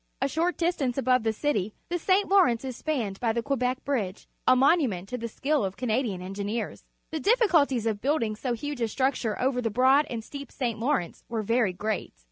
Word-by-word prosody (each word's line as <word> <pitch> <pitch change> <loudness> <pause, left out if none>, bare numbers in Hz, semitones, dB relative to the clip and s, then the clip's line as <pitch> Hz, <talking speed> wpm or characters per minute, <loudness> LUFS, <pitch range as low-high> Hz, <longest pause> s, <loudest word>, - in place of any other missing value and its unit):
A 270 - +1
short 330 +5 0
distance 305 -8 0
above 255 -1 +3
the 225 - 0
cit^^ 220 -4 -1 0.2
the 350 0 -1
St. 385 +4 +2
Lawrence 345 - +4
is 260 -2 -4
spanned 235 -10 -2
by 235 -2 +1
the 230 +1 -2
Quebec 255 -1 -1
Bridge, 215 -9 -2 0.2
a - - +7
monument 255 - +3
to 250 - -3
the 230 - -3
skill 285 +5 0
of 190 -1 -3
Canadian 225 -6 -1
en 190 +1 -6
gineers. 205 +3 -4 0.3
The 315 - -2
difficulties 325 - +3
of 215 -2 -1
building 260 -7 0
so 245 +3 -2
huge 290 +2 -5
a 230 - +2
structure 255 -2 -1
over 250 -1 +1
the 230 - 0
broad 260 +6 +4
and 225 -2 -5
deep 280 -1 -8
St. 235 -5 -2
Lawrence 240 -8 -1
were 225 -2 -2
very 230 -1 +2
great. 210 - -3
250 Hz, 205 wpm, -27 LUFS, 220-285 Hz, 0.3 s, a